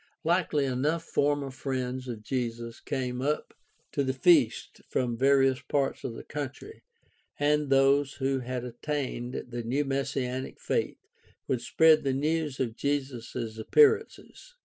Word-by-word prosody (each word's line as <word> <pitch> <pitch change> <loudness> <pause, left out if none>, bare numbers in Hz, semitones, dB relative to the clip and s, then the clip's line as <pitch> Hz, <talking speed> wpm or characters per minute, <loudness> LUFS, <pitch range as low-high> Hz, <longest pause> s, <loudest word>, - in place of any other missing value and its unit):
Likely 165 -4 +2
enough 145 +6 0
former 145 -3 0
friends 130 0 -3
of 115 -3 -6
Jesus 115 -1 -3
came 125 -3 -3
up 150 +3 -1 0.4
to 140 - 0
the 130 0 -1
feast 145 -6 +3
from 120 -2 0
various 135 +1 +3
parts 140 -2 -1
of 115 - -4
the - - -8
country, 145 - -7 0.6
and 150 0 +2
those 135 +1 +4
who 135 0 -1
had 125 0 -4
attained 125 0 -4
the 120 0 -4
new 130 +6 -1
messianic 135 -1 -2
faith - - -1 0.5
would 125 -3 0
spread 160 -1 +5
the 135 -1 +1
news 150 0 -1
of 115 -4 -1
Jesus' 125 -5 -3
appearances. 445 - +2
135 Hz, 135 wpm, -28 LUFS, 125-145 Hz, 0.6 s, spread